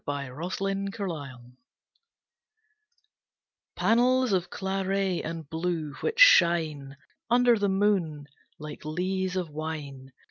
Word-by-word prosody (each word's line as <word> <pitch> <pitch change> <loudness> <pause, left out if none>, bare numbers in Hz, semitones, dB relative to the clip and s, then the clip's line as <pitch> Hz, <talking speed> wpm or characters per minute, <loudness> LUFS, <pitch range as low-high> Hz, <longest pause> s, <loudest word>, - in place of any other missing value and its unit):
The - - -3
Exeter 195 - -4
Road 130 -7 -8 2.2
Panels 250 0 +2
of 180 -1 0
claret 190 -1 -2
and 165 -2 -6
blue 160 -2 -3
which 460 +1 -2
shine 160 - +5 0.3
Under 245 0 +4
the 205 -2 0
moon 190 -7 0 0.3
like 150 -1 -9
lees 185 +4 -2
of 180 -4 -3
wine. 145 -4 -6
175 Hz, 100 wpm, -27 LUFS, 150-195 Hz, 2.2 s, shine